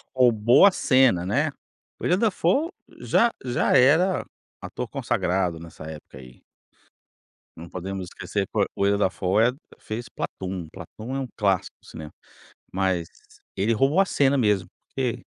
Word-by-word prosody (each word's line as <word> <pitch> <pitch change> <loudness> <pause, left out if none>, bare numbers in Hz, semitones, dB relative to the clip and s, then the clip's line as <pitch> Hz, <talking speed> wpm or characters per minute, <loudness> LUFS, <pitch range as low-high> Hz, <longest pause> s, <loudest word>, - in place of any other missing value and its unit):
Roubou 120 - +5
a 200 - +7
cena, 130 - +3
né? 140 +11 0 0.5
Willem 180 +2 +1
Dafoe 225 - +1 0.3
já 235 0 +2
já 125 -1 +1
era 160 +9 +4 0.4
ator - - -5
consagrado 90 -2 -1
nessa 80 -1 -11
época 75 -3 -10
aí. 65 -1 -15 1.1
Não 85 +1 -10
podemos 95 +1 -5
esquecer 85 - -4
foi - - +2
Willem 100 +1 +2
Dafoe 105 +4 +2 0.2
fez 115 +2 -6
Platoon. 95 -3 -5
Platoon 110 +7 -8
é - - -1
um 135 - -3
clássico 100 -4 0
do - - -21
cinema, 75 -1 -9 0.6
mas 95 -3 0 0.5
ele 105 +4 +1
roubou 135 - +2
a - - +3
cena 140 -6 +2
mesmo, 105 -7 +1 0.2
porque 125 -4 -3
105 Hz, 135 wpm, -24 LUFS, 90-135 Hz, 1.1 s, a